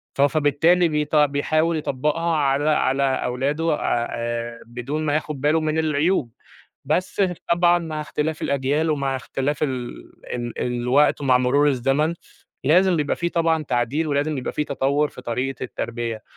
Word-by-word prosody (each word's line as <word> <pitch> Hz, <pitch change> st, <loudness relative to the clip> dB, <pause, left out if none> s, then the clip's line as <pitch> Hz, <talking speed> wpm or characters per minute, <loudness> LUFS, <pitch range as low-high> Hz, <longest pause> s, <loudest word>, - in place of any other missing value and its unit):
ف 135 Hz, -, 0 dB
فبالتالي 155 Hz, +4 st, +3 dB
بيط 150 Hz, 0 st, -1 dB
بيحاول 155 Hz, +3 st, +2 dB
يطبّقها 150 Hz, +4 st, -1 dB
على 145 Hz, +1 st, +1 dB
على 140 Hz, -2 st, +2 dB
أولاده 140 Hz, +4 st, 0 dB
آآ، 120 Hz, 0 st, -2 dB
بدون 125 Hz, +6 st, -4 dB
ما 145 Hz, -, +1 dB
ياخد 150 Hz, -3 st, -3 dB
باله 150 Hz, +3 st, +3 dB
من 155 Hz, +1 st, 0 dB
العيوب، 150 Hz, -4 st, +1 dB, 0.5 s
بس 180 Hz, +7 st, 0 dB, 0.3 s
طبعًا 175 Hz, 0 st, +4 dB
مع 155 Hz, -2 st, -4 dB
اختلاف 150 Hz, +1 st, -3 dB
الأجيال 140 Hz, +3 st, 0 dB
ومع 140 Hz, -2 st, -1 dB
اختلاف 135 Hz, +3 st, -2 dB
ال 130 Hz, -4 st, -2 dB, 0.4 s
ال 120 Hz, -1 st, -4 dB
الوقت 125 Hz, +5 st, +2 dB
ومع 130 Hz, -2 st, +4 dB
مرور 140 Hz, +4 st, +3 dB
الزمن، 135 Hz, +4 st, +1 dB, 0.5 s
لازم 180 Hz, +6 st, +4 dB
بيبقى 145 Hz, -1 st, 0 dB
في 170 Hz, 0 st, -1 dB
طبعًا 165 Hz, -2 st, +1 dB
تعديل، 130 Hz, +4 st, -1 dB
ولازم 145 Hz, 0 st, 0 dB
يبقى 125 Hz, -, -4 dB
في 150 Hz, -, 0 dB
تطوّر 140 Hz, +1 st, 0 dB
في 125 Hz, -, -12 dB
طريقة 125 Hz, +3 st, -3 dB
التربية. 120 Hz, -2 st, -4 dB
145 Hz, 145 wpm, -22 LUFS, 130-155 Hz, 0.5 s, طبعًا